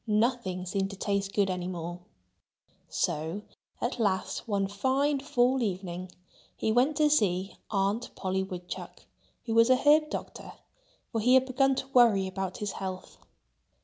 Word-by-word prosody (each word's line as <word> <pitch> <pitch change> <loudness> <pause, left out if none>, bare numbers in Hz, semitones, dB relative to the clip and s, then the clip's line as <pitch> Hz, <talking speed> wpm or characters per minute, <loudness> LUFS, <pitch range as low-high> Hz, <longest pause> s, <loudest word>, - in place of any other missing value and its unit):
Nothing 210 -4 0
seemed 195 +1 -1
to 195 - -7
taste 200 0 -1
good 200 -1 +2
any 180 -1 -3
more. 175 -1 -5 0.9
So 160 +7 -2 0.4
at 240 +1 -2
last, 195 +1 -1
one 200 -2 +1
fine 265 +8 +1
fall 260 -2 +2
evening 185 -3 -3 0.5
he 220 - 0
went 255 +6 +3
to 305 - +4
see 195 -9 +1
Aunt 200 +3 0
Polly 190 0 -1
Woodchuck, 180 -2 -7 0.4
who 225 - -2
was 230 +1 +5
an 255 - +6
herb 300 +3 +4
doctor; - - -6 0.6
for 225 - -1
he 250 +4 +5
had 260 0 +5
begun 270 +1 +2
to 265 - -4
worry 235 -7 +5
about 190 -1 -4
his 210 -1 -3
health. 185 -1 -6
205 Hz, 150 wpm, -29 LUFS, 190-250 Hz, 0.9 s, an